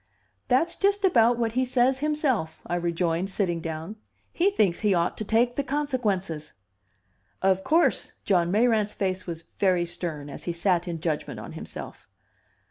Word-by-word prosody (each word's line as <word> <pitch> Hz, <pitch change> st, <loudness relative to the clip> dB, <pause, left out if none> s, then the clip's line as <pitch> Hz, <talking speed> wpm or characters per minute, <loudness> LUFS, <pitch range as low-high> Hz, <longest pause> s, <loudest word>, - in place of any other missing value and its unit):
"That's 320 Hz, +7 st, +2 dB
just 400 Hz, 0 st, +2 dB
about 240 Hz, -9 st, +4 dB
what 230 Hz, -2 st, 0 dB
he 255 Hz, +3 st, +1 dB
says 255 Hz, +1 st, +2 dB
himself," 275 Hz, -, 0 dB
I 175 Hz, -, -2 dB
rejoined, 170 Hz, +1 st, 0 dB
sitting 180 Hz, -4 st, -1 dB
down. 160 Hz, +6 st, -5 dB, 0.4 s
"He 360 Hz, +4 st, +3 dB
thinks 205 Hz, -, +1 dB
he 210 Hz, -3 st, +2 dB
ought 170 Hz, 0 st, +1 dB
to -, -, -2 dB
take 235 Hz, +3 st, +2 dB
the 280 Hz, -, +1 dB
consequences." 220 Hz, -, -2 dB, 0.9 s
"Of 190 Hz, 0 st, +3 dB
course!" 330 Hz, -, +2 dB
John 175 Hz, -4 st, +3 dB
Mayrant's 215 Hz, 0 st, +2 dB
face 185 Hz, -1 st, -2 dB
was 165 Hz, -1 st, -5 dB, 0.2 s
very 180 Hz, -3 st, +3 dB
stern 170 Hz, -4 st, -5 dB
as 145 Hz, -, -9 dB
he 175 Hz, -, -1 dB
sat 175 Hz, 0 st, +1 dB
in 165 Hz, -2 st, -4 dB
judgment 160 Hz, -3 st, -2 dB
on -, -, -8 dB
himself. -, -, -8 dB
195 Hz, 160 wpm, -26 LUFS, 170-250 Hz, 0.9 s, about